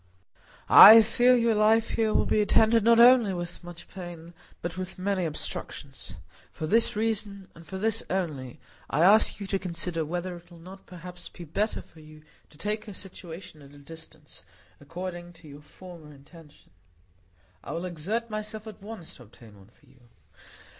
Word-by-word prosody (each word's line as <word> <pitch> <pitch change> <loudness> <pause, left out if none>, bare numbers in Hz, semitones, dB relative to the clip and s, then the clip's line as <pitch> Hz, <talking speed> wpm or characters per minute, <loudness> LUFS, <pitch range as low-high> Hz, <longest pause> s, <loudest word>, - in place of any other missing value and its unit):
I 220 +2 +10
fear 245 +3 +3
your 230 -1 +2
life 220 +1 +2
here 220 -1 0
will - - +1
be 215 - +1
attended 220 +1 +3
not 230 +1 +5
only 235 -5 +6
with 175 0 -7
much 175 0 -11
pain, 175 -3 -10 0.3
but 170 -1 -4
with 185 0 -7
many 185 -1 -1
obstructions. 155 -2 -7 0.4
For 155 - -6
this 225 +8 +2
reason—and 200 -5 -4
for 190 - -7
this 220 +2 -1
only—I 150 -4 -5
ask 210 +4 +4
you 200 - -6
to 195 0 -2
consider 170 -2 -3
whether 175 +3 -5
it 175 0 -15
will 170 - -15
not 185 +3 -14
perhaps 180 -1 -9
be 175 - -12
better 200 +7 -3
for 160 - -20
you 155 0 -16 0.3
to 150 - -20
take 215 +5 -4
a 205 - -9
situation 175 -4 -10
at 140 0 -16
a - - -15
distance, 160 0 -13 0.4
according 175 +3 -8
to 165 -2 -17
your 145 0 -12
former 165 0 -14
intention. 150 +2 -18 0.9
I - - -8
will 170 +2 -4
exert 185 +7 -4
myself 215 0 -6
at 215 -3 -11
once 205 -5 -10
to - - -17
obtain 110 -1 -17
one 100 +1 -19
for - - -26
you." 130 - -24
180 Hz, 170 wpm, -26 LUFS, 165-215 Hz, 0.9 s, I